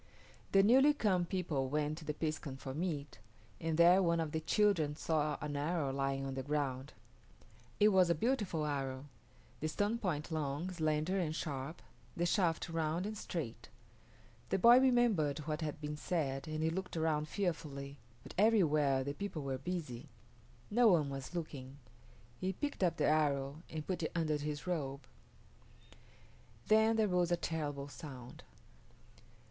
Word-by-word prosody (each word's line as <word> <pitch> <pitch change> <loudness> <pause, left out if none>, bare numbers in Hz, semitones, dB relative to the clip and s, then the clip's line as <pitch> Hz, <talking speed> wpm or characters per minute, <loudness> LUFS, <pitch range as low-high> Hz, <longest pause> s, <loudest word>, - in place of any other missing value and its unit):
The 195 0 +6
newly 270 +7 +6
come 190 -9 +2
people 165 -8 -1
went 150 +2 -1
to 160 - -11
the 150 - -3
piskun 155 -4 -3
for 135 0 -6
meat, 150 -2 -3 0.4
and 160 -1 -1
there 175 +3 +7
one 170 -2 +2
of 160 -2 -2
the 160 - -1
children 160 -4 +2
saw 150 -2 0
an 150 -1 -3
arrow 145 -1 -1
lying 135 0 -1
on 135 - -3
the 135 - -3
ground. 140 -2 -2 0.9
It 210 - +6
was 185 -3 +4
a 170 - +3
beautiful 205 - 0
arrow, 135 -2 -3 0.5
the 155 - -1
stone 205 +8 0
point 170 -6 -2
long, 155 +3 -2
slender, 160 +2 0
and 155 -3 -1
sharp, 140 0 -4 0.3
the 170 - +1
shaft 175 -2 +1
round 165 +2 -1
and 215 +1 -4
straight. 125 - -5 0.8
The - - +2
boy 235 +6 +8
remembered 240 - +3
what 155 +1 -2
had 155 -1 -3
been 150 0 -4
said 145 -4 -2
and 155 0 -2
he 160 - +2
looked 185 0 -4
around 155 -1 +1
fearfully, 145 -7 -3 0.2
but - - -10
everywhere 155 -11 +4
the 140 +1 -3
people 175 -3 -5
were 135 -1 -3
busy. 150 -4 -5 0.6
No 240 +2 +5
one 155 -8 +4
was 135 +5 -6
looking. 140 -5 -6 0.6
He 190 +1 -1
picked 290 +6 -4
up 175 - +2
the - - +2
arrow 145 -1 +1
and 155 -1 -5
put 185 -2 -2
it 160 - -2
under 155 -3 +1
his 150 0 -4
robe. 145 -6 -3 1.6
Then 220 +1 +5
there 220 -1 +3
rose 180 -2 +1
a 175 - +3
terrible 145 -4 -3
sound. 130 -5 -10
155 Hz, 160 wpm, -35 LUFS, 145-180 Hz, 1.6 s, boy